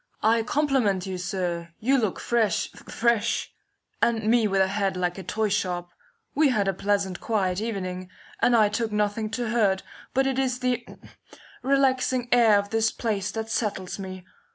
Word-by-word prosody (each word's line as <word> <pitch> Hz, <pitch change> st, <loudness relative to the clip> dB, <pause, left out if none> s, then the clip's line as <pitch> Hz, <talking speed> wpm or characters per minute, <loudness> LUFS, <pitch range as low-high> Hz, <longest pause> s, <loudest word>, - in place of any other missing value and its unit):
"I 225 Hz, +1 st, +4 dB
compliment 250 Hz, -8 st, +1 dB
you, 190 Hz, -1 st, -4 dB
sir! 175 Hz, -2 st, -3 dB
You 265 Hz, +4 st, +2 dB
look 215 Hz, -6 st, -1 dB
fresh, 220 Hz, -2 st, +1 dB
fresh, 235 Hz, -1 st, -1 dB, 0.5 s
and 225 Hz, -2 st, +2 dB
me 225 Hz, 0 st, +3 dB
with 195 Hz, -1 st, +1 dB
a 190 Hz, -, +4 dB
head 195 Hz, -1 st, -1 dB
like 180 Hz, +1 st, -1 dB
a -, -, -7 dB
toy 215 Hz, +4 st, -1 dB
shop. 180 Hz, -3 st, -1 dB, 0.4 s
We 300 Hz, 0 st, +4 dB
had 210 Hz, -6 st, +1 dB
a 195 Hz, -, +2 dB
pleasant, 200 Hz, -1 st, -1 dB
quiet 195 Hz, -4 st, 0 dB
evening, 185 Hz, -5 st, -4 dB, 0.3 s
and 245 Hz, -, +4 dB
I 215 Hz, -2 st, +5 dB
took 220 Hz, +1 st, -2 dB
nothing 210 Hz, +1 st, 0 dB
to 240 Hz, -2 st, -2 dB
hurt, 205 Hz, -5 st, +2 dB, 0.3 s
but 270 Hz, +1 st, +3 dB
it 265 Hz, -1 st, 0 dB
is 255 Hz, -2 st, 0 dB
the 250 Hz, -1 st, -1 dB, 0.8 s
relaxing 260 Hz, -2 st, +1 dB
air 230 Hz, -4 st, +6 dB
of 200 Hz, 0 st, -2 dB
this 225 Hz, 0 st, +2 dB
place 210 Hz, -5 st, -2 dB
that 225 Hz, 0 st, -4 dB
settles 205 Hz, -5 st, -2 dB
me. 185 Hz, -1 st, -7 dB
215 Hz, 170 wpm, -25 LUFS, 190-235 Hz, 0.8 s, air